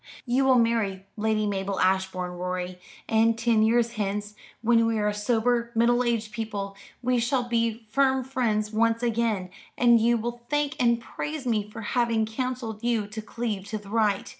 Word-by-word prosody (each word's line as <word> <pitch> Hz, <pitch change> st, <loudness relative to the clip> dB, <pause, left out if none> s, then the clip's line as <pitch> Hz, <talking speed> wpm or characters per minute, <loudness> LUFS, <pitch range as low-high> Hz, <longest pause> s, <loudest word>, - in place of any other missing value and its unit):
You 255 Hz, +2 st, +2 dB
will 260 Hz, -1 st, +5 dB
marry 220 Hz, -5 st, +1 dB
Lady 215 Hz, 0 st, 0 dB
Mabel 195 Hz, -1 st, -2 dB
Ashbourne, 185 Hz, -1 st, +1 dB
Rorie: 180 Hz, 0 st, -4 dB, 0.3 s
and 225 Hz, 0 st, +3 dB
ten 230 Hz, -1 st, +2 dB
years 230 Hz, +1 st, +3 dB
hence, 205 Hz, -1 st, -3 dB, 0.3 s
when 230 Hz, 0 st, +4 dB
we 225 Hz, -1 st, 0 dB
are 210 Hz, 0 st, +1 dB
sober 235 Hz, +3 st, +1 dB
middle 240 Hz, +2 st, +3 dB
aged 230 Hz, -3 st, -1 dB
people, 205 Hz, -3 st, -4 dB, 0.3 s
we 250 Hz, 0 st, +2 dB
shall 245 Hz, +2 st, +1 dB
be 230 Hz, -1 st, 0 dB
firm 265 Hz, +2 st, +2 dB
friends 225 Hz, -5 st, -1 dB
once 230 Hz, +1 st, +1 dB
again, 225 Hz, -6 st, 0 dB, 0.3 s
and 235 Hz, -2 st, +5 dB
you 235 Hz, +1 st, +3 dB
will 240 Hz, +1 st, -4 dB
thank 295 Hz, 0 st, 0 dB
and 235 Hz, -1 st, +3 dB
praise 300 Hz, +4 st, -5 dB
me 215 Hz, -4 st, 0 dB
for 220 Hz, -, -8 dB
having 230 Hz, -1 st, +1 dB
counselled 230 Hz, -1 st, -4 dB
you 235 Hz, -3 st, +1 dB
to 220 Hz, +1 st, -6 dB
cleave 215 Hz, -3 st, -4 dB
to 215 Hz, +2 st, -3 dB
the 205 Hz, -1 st, -12 dB
right. 210 Hz, -3 st, +1 dB
225 Hz, 170 wpm, -26 LUFS, 210-240 Hz, 0.3 s, will